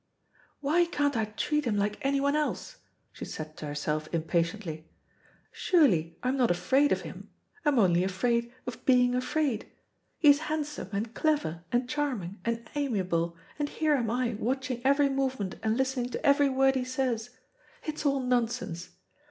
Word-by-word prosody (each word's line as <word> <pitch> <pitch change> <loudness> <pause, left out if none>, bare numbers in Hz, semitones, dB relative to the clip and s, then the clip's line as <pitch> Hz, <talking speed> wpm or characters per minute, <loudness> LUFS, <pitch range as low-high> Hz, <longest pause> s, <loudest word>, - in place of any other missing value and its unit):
"Why 320 +5 +3
can't 290 -4 0
I 220 -1 +1
treat 295 +8 -1
him 215 -4 +1
like 205 +1 0
anyone 280 +1 +1
else?" 305 +11 -2 0.4
she - - -8
said 155 0 -6
to 150 - -6
herself 150 +1 -2
impatiently. 165 0 -2 0.6
"Surely 175 - +2
I 250 - +1
am 265 - 0
not 250 -3 +3
afraid 260 - +3
of - - +2
him. - - -9 0.3
I 295 - +3
am 280 - +2
only 180 -5 +4
afraid 235 +5 0
of 250 -2 -6
being 250 -1 +4
afraid. 255 -1 -1 0.5
He 300 - +6
is 285 0 +7
handsome, 300 -1 -3
and 215 +3 -3
clever, 285 - 0
and 245 +1 +1
charming, 250 -10 -2
and 230 0 -2
amiable, 185 -12 -1 0.2
and 290 0 0
here 310 0 +1
am 240 -6 +1
I 240 -1 0
watching 255 +1 -2
every 280 +2 +4
movement 265 -8 -1
and 220 +1 +1
listening 260 -2 0
to - - -5
every 280 0 +5
word 270 0 +3
he 260 -1 0
says. 250 -3 -1 0.5
It's 310 -1 -4
all 275 -2 +2
nonsense. 230 -8 -1
250 Hz, 165 wpm, -29 LUFS, 200-280 Hz, 0.6 s, is